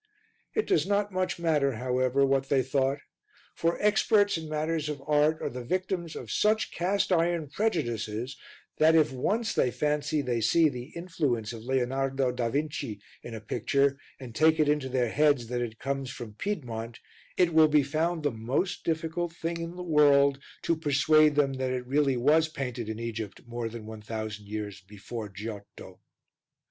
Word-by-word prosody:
It 435 - +1
does 155 +2 +2
not 205 0 +1
much 185 0 -1
matter, 150 -5 +1
however, 130 +3 +1
what 135 0 +1
they 135 -2 +3
thought, 135 +1 0 0.6
for 165 +1 0
experts 210 0 +3
in 160 -2 -5
matters 155 0 -1
of 150 -2 -4
art 150 +1 +3
are - - -1
the 125 0 -6
victims 180 +2 -2
of - - -7
such 215 +1 +2
cast 190 +3 0
iron 170 -3 +1
prejudices 120 - -2 0.4
that 160 +1 +6
if 155 -2 +4
once 220 - -1
they 125 - +2
fancy 150 +2 0
they 120 -3 -1
see 155 +8 +4
the 125 -3 -6
influence 145 -10 -2
of 115 0 -9
Leonardo 135 +1 0
da 125 -2 -1
Vinci 140 -6 -3 0.2
in 120 - -8
a - - -5
picture 140 +6 0 0.2
and 125 -4 -9
take 160 +4 +4
it 155 - +4
into 145 -3 +1
their 125 -2 +1
heads 145 -2 +3
that 120 0 -1
it 115 -2 -4
comes 135 0 -3
from 120 -4 -8
Piedmont, 120 - -4 0.4
it 175 -2 +3
will 160 0 +7
be 150 -1 +4
found 160 +4 -1
the 145 - +1
most 125 - -2
difficult 165 +1 -2
thing 170 0 -4
in 165 +1 -6
the 180 - -6
world 140 -4 +4 0.2
to 165 - +2
persuade 155 0 +4
them 140 -2 +2
that 130 -1 -2
it 125 -1 -3
really 135 0 +2
was 155 +6 +4
painted 125 -7 -5
in 110 - -4
Egypt 110 -3 -5
more 120 -1 -4
than 115 -1 -8
1000 110 -1 -6
years 105 -2 -5
before 105 +3 -8
Giotto. 105 +1 -9
140 Hz, 175 wpm, -28 LUFS, 120-160 Hz, 0.6 s, will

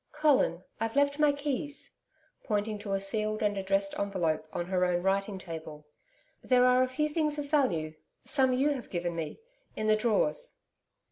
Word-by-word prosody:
'Colin 285 - +2 0.2
I've 225 +2 -2
left 285 +1 +2
my 300 -1 +5
keys,' 285 0 -4 0.5
pointing 210 -1 -1
to 205 -1 -4
a 195 - +1
sealed 215 +2 0
and 205 -1 +1
addressed 195 0 0
envelope 175 -6 -1
on 175 - -3
her 180 0 0
own 175 -1 +1
writing 195 +1 0
table. 160 -4 -8 0.6
'There 250 -1 +4
are 250 0 +5
a 255 - +3
few 290 +4 0
things 300 -1 0
of 285 -1 -5
value 170 - +1 0.3
some 265 -3 +3
you 265 +4 +2
have 265 -4 -5
given 175 -1 -2
me 165 - -5 0.4
in 215 - -3
the 215 0 +5
drawers.' 240 - +1
215 Hz, 175 wpm, -30 LUFS, 190-280 Hz, 0.6 s, my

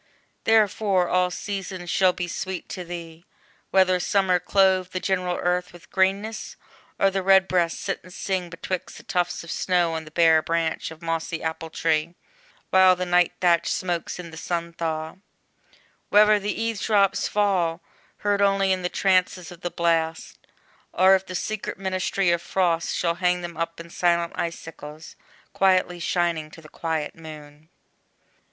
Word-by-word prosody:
Therefore 205 -4 +3
all 180 0 +2
seasons 190 -1 -5
shall 185 -1 +4
be 175 0 -4
sweet 185 +1 -5
to 180 - -5
thee, 170 -1 -8 0.5
Whether 185 -1 +3
summer 185 -1 +2
clothe 190 -1 +2
the 185 - -1
general 180 -2 -1
earth 180 0 -1
With 175 - -16
greeness, 200 +3 0 0.4
or 195 - +3
the 195 0 -1
redbreast 185 -3 +3
sit - - -3
and 180 - -14
sing 185 -1 -3
Betwixt 180 +2 -5
the - - -12
tufts 180 -3 -1
of 170 - -8
snow 175 -3 +1
on 160 0 -4
the - - -11
bare 160 0 +4
branch 165 0 -1
Of 160 +1 -13
mossy 165 0 -3
apple 160 0 -4
tree, 160 +1 0 0.6
while 185 -1 +6
the 180 0 -3
nigh 175 -1 +3
thatch 170 -2 +3
Smokes 175 -3 -2
in 175 -2 -8
the 160 - -10
sun 170 0 -3
thaw; 160 0 -4 0.9
whether 210 0 +6
the 205 +1 -3
eave 225 -2 -2
drops 200 -2 +2
fall 185 -5 +1 0.5
Heard 205 -1 +2
only 195 -1 +3
in 185 -1 0
the 180 - -1
trances 185 -2 +1
of 175 - -12
the 175 - -2
blast, 165 -1 -1 0.5
Or 190 +1 +5
if 190 0 +1
the 185 - -6
secret 215 +3 -3
ministry 190 -1 0
of 170 0 +1
frost 175 -2 0
Shall 170 -1 +1
hang 180 0 +2
them 170 -1 -6
up 165 +1 -4
in 170 0 -10
silent 170 -1 +1
icicles, 160 -2 -7 0.4
Quietly 185 -2 +2
shining 170 -3 -1
to 160 - -13
the 155 - -14
quiet 160 -2 -3
Moon. 155 -1 -12
180 Hz, 160 wpm, -24 LUFS, 165-190 Hz, 0.9 s, while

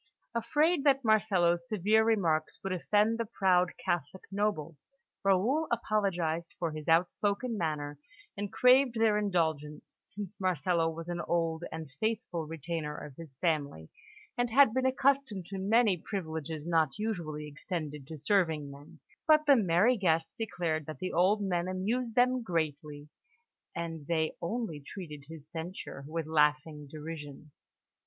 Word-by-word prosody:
Afraid 300 +7 +2
that 275 -2 +4
Marcello's 180 -6 +3
severe 215 +2 +3
remarks 170 -9 +1
would 195 -1 -2
offend 210 +5 +2
the 230 - 0
proud 180 -3 +3
Catholic 175 +2 -2
nobles, 180 -8 -2 0.3
Raoul 220 +12 +2
apologised 175 -8 -1
for 170 -2 -2
his 155 -1 -7
outspoken 200 +8 +1
manner, 150 -5 -3 0.4
and 205 -1 -4
craved 250 0 +5
their 220 -2 +3
indulgence, 160 -7 -2
since 200 0 -8
Marcello 170 -2 +1
was 165 +1 -7
an 175 0 -3
old 165 -1 0
and 160 -3 -7
faithful 215 -7 -2
retainer 160 -1 -4
of 145 - -9
his 155 -4 -10
family, 145 - -1 0.5
and 245 0 +2
had 265 -1 +6
been 260 +1 +2
accustomed 265 -7 +1
to 195 +2 -6
many 210 0 +3
privileges 160 -4 -5
not 165 -2 +1
usually 170 -9 -3
extended 150 -2 -5
to 160 - -7
serving 155 -3 +1
men; 140 +1 -14 0.3
but 305 -1 +5
the 285 - +7
merry 210 +3 +3
guests 165 -4 +1
declared 170 - -2
that 155 -3 -6
the 185 - -4
old 195 +5 +3
man 175 -2 0
amused 220 +6 -2
them 250 +1 +3
greatly, 150 -6 -3 0.7
and 165 -3 -5
they 160 -2 0
only 175 -3 -3
treated 150 -1 -9
his 160 -3 -10
censure 165 -4 -6
with 165 +1 -3
laughing 150 -1 +1
derision. 150 -1 -8
175 Hz, 140 wpm, -31 LUFS, 155-215 Hz, 0.7 s, the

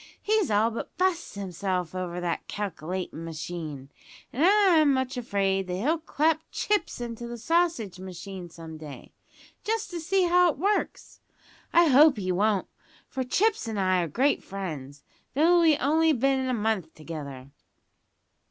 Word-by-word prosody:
He's 430 -2 +1
all 215 +2 +3
but 230 - -7
bu'st 365 - 0
himself 185 -3 -3
over 180 -1 -4
that 175 -1 -3
calc'latin' 180 -3 -4
machine, 155 -4 -6 0.4
and 275 - 0
I'm 360 -7 +5
much 260 0 -1
afraid 195 -5 0
that 180 - -3
he'll 295 - 0
clap 315 0 +1
Chips 420 -9 -1
into 235 0 -5
the 240 0 -6
sausage 320 - 0
machine 185 0 -8
some 160 -1 -10
day, 150 -3 -10 0.5
just 445 -1 -2
to 345 - -4
see 375 +4 +1
how 355 0 +5
it 300 - -3
works. 405 +7 -2 0.5
I 340 0 +6
hope 285 0 +6
he 185 -2 -2
won't, 200 +2 +1 0.4
for 265 - -3
Chips 415 - +1
an' 220 -2 -3
I 185 -2 +2
are 170 - -1
great 265 - +1
friends, 145 -8 -7 0.3
though 340 +4 +5
we've 320 -3 +5
only 315 +3 +3
bin 265 0 +1
a - - +1
month 210 -7 -1
together." 140 -4 -8
220 Hz, 150 wpm, -27 LUFS, -, 0.5 s, I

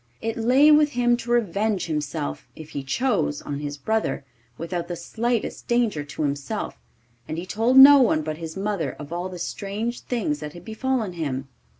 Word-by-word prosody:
It 225 0 -3
lay 255 +6 +5
with 300 -1 +5
him 240 0 +3
to 240 0 -8
revenge 215 -3 +1
himself, 150 - -3
if 155 -1 -11
he 140 - -4
chose, 145 - 0
on 145 -1 -5
his 145 0 -5
brother, 220 -3 -1 0.3
without 170 +1 -4
the 175 - -4
slightest 235 +6 -2
danger 235 -10 +1
to 145 +2 -5
himself, 140 -2 -3 0.5
and 155 - -4
he 170 - -4
told 225 +7 +1
no 280 +1 +11
one 155 -11 +3
but 155 0 -4
his 165 0 -7
mother 195 -9 -2
of 145 +2 -8
all 175 +2 -3
the 180 - -8
strange 205 +7 -4
things 200 - -2
that 150 0 -7
had 175 0 -12
befallen 225 -3 -2
him. 135 -5 -4
185 Hz, 185 wpm, -24 LUFS, 150-235 Hz, 0.5 s, no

